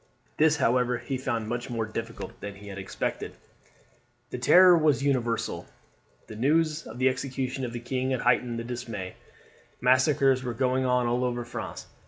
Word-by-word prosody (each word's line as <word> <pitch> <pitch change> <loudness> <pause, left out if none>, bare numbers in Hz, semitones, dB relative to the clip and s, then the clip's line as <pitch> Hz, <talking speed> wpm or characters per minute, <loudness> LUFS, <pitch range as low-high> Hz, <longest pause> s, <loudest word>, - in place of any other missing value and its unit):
This, 155 0 +4
however, 125 -1 +2
he 135 - -4
found 115 -4 -2
much 120 +1 -4
more 115 -2 -2
difficult 115 +1 -7
than 100 -1 -6
he 100 +1 -11
had 100 0 -7
expected. 95 - -4 1.0
The - - -4
terror 175 +8 +7
was 150 -5 +2
universal. 120 -5 -1 0.6
The 110 - -10
news 155 +6 +1
of 110 - -9
the 130 +1 +3
execution 130 0 -2
of 120 - -5
the 120 - -5
king 130 +1 -2
had 130 -2 -1
heightened 120 -1 +2
the 115 - -4
dismay. 115 -6 -6 0.7
Massacres 130 +1 +3
were 120 -2 -4
going 130 +1 +1
on 125 -1 +2
all 120 +1 0
over 120 -1 -2
France. 120 - -6
125 Hz, 170 wpm, -27 LUFS, 115-130 Hz, 1.0 s, terror